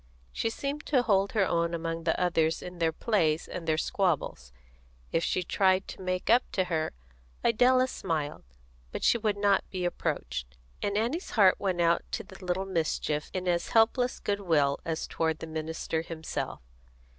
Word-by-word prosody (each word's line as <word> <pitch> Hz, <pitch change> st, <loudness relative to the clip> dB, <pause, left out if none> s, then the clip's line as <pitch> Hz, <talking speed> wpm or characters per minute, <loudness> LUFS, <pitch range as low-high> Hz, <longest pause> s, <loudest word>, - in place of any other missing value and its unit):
She 225 Hz, -, -1 dB
seemed 280 Hz, +5 st, -4 dB
to 260 Hz, -5 st, +3 dB
hold 200 Hz, -3 st, +2 dB
her 205 Hz, -4 st, +3 dB
own 170 Hz, -1 st, 0 dB
among 165 Hz, 0 st, -4 dB
the 160 Hz, -, +1 dB
others 165 Hz, -3 st, +1 dB
in 180 Hz, -1 st, -8 dB
their 165 Hz, -1 st, +2 dB
plays 165 Hz, -4 st, +1 dB
and 170 Hz, -2 st, -6 dB
their 155 Hz, -1 st, +2 dB
squabbles; 155 Hz, -, -1 dB, 0.6 s
if 165 Hz, -, +1 dB
she 185 Hz, -, 0 dB
tried 190 Hz, +1 st, +2 dB
to -, -, -8 dB
make 185 Hz, 0 st, -2 dB
up 240 Hz, +3 st, +6 dB
to 185 Hz, -, +2 dB
her, 165 Hz, -3 st, -1 dB, 0.5 s
Idella 255 Hz, +3 st, +4 dB
smiled, 155 Hz, -, -3 dB, 0.5 s
but -, -, -5 dB
she 235 Hz, -, +4 dB
would 210 Hz, -2 st, 0 dB
not 200 Hz, -1 st, +3 dB
be 185 Hz, -2 st, -3 dB
approached, 60 Hz, -, -3 dB, 0.2 s
and 200 Hz, 0 st, 0 dB
Annie's 250 Hz, -, -1 dB
heart 195 Hz, -4 st, +5 dB
went 185 Hz, -3 st, 0 dB
out 170 Hz, 0 st, +3 dB
to -, -, -2 dB
the 190 Hz, 0 st, -13 dB
little 180 Hz, +1 st, -1 dB
mischief 160 Hz, -4 st, -1 dB
in 185 Hz, -1 st, -3 dB
as 175 Hz, -1 st, +1 dB
helpless 240 Hz, +3 st, +3 dB
goodwill 165 Hz, -9 st, +1 dB
as 165 Hz, -1 st, -2 dB
toward 160 Hz, -1 st, -1 dB
the -, -, -7 dB
minister 160 Hz, 0 st, -3 dB
himself. 165 Hz, -, -5 dB
180 Hz, 170 wpm, -29 LUFS, 160-200 Hz, 0.6 s, up